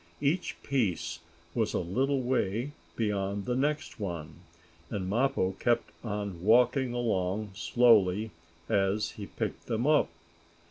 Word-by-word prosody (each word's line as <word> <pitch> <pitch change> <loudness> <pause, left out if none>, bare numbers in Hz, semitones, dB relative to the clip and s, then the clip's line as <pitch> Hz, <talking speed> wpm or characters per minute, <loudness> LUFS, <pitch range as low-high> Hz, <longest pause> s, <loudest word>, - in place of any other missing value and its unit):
Each 150 +6 0
piece 90 - 0 0.3
was 110 -2 0
a - - +2
little 130 +10 0
way 125 +1 0 0.2
beyond 100 -2 -1
the 125 - 0
next 145 0 -1
one, 85 -6 -5 0.5
and 95 -3 -3
Mappo 120 -2 +1
kept 120 -1 +1
on 100 -5 -4
walking 125 +4 +4
along 105 -4 -1
slowly 105 +2 +4 0.4
as 100 +2 +1
he 100 -2 -8
picked - - -4
them 115 +1 0
up. 150 0 +4
110 Hz, 125 wpm, -30 LUFS, 95-125 Hz, 0.5 s, walking